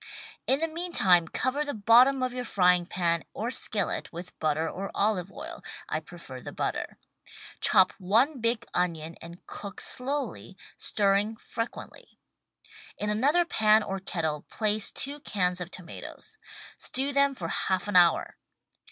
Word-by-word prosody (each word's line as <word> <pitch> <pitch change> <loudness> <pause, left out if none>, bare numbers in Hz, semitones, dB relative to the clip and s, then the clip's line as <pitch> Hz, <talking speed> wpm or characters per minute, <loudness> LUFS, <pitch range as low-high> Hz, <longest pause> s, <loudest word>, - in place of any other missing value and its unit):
In 270 +3 +2
the 325 - +2
meantime 315 - +3
cover 260 - -1
the 285 -3 -4
bottom 245 +5 +5
of 255 -1 -1
your 250 0 -3
frying 180 -5 +3
pan 170 -2 0
or 230 +3 -2
skillet 210 -5 -1
with 175 +2 -8
butter 155 +1 +1
or 195 +4 -5
olive 195 -3 0
oil - - -9 0.2
(I 155 - -1
prefer 155 -5 -10
the - - -8
butter). - - -3 0.6
Chop 185 - +5
one 235 +10 +2
big 230 0 0
onion 165 -2 -1
and 170 +1 -11
cook 200 -2 -8
slowly, 255 -7 -4 0.2
stirring 205 +2 +1
frequently. 230 +1 -7 0.8
In 210 0 -1
another 290 +11 +3
pan 215 -7 +4
or 195 -1 -3
kettle 160 -5 -2
place 215 -1 +1
two 285 +2 -2
cans 180 -9 0
of 175 - -4
tomatoes. 190 - -10 0.4
Stew 275 +2 0
them 280 0 +3
for 170 -8 -5
half 185 +1 -1
an 205 - -3
hour. 175 -2 +4
205 Hz, 145 wpm, -28 LUFS, 180-255 Hz, 0.8 s, bottom